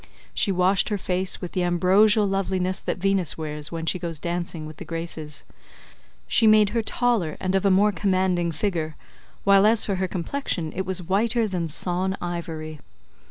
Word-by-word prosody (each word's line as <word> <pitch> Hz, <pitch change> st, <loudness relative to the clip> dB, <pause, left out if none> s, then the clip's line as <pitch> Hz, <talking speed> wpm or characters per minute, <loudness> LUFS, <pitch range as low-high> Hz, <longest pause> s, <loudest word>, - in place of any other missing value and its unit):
She 200 Hz, -, +2 dB
washed 185 Hz, +1 st, +2 dB
her 210 Hz, -, -1 dB
face 185 Hz, 0 st, -1 dB
with 180 Hz, -, -6 dB
the 185 Hz, -, -1 dB
ambrosial 190 Hz, +5 st, +4 dB
loveliness 190 Hz, -1 st, -1 dB
that -, -, -3 dB
Venus 195 Hz, -2 st, 0 dB
wears 150 Hz, -1 st, -4 dB
when 165 Hz, -1 st, -4 dB
she 180 Hz, -, 0 dB
goes 170 Hz, -3 st, -4 dB
dancing 170 Hz, 0 st, -4 dB
with 155 Hz, 0 st, -10 dB
the -, -, -8 dB
Graces; 165 Hz, -3 st, -5 dB, 0.8 s
she 225 Hz, -, +4 dB
made 215 Hz, -1 st, +6 dB
her 230 Hz, +2 st, 0 dB
taller 225 Hz, -8 st, 0 dB
and 185 Hz, 0 st, -2 dB
of 195 Hz, 0 st, +1 dB
a -, -, +4 dB
more 200 Hz, +3 st, +4 dB
commanding 185 Hz, -2 st, 0 dB
figure, 160 Hz, -2 st, -2 dB, 0.5 s
while 200 Hz, -1 st, +5 dB
as 220 Hz, +1 st, +5 dB
for 195 Hz, -3 st, -1 dB
her 185 Hz, 0 st, -1 dB
complexion 180 Hz, -, -3 dB
it 190 Hz, 0 st, -3 dB
was 185 Hz, -1 st, -1 dB
whiter 220 Hz, +6 st, +1 dB
than 180 Hz, -4 st, -2 dB
sawn 185 Hz, +4 st, -1 dB
ivory. 165 Hz, -3 st, -5 dB
185 Hz, 175 wpm, -24 LUFS, 170-195 Hz, 0.8 s, made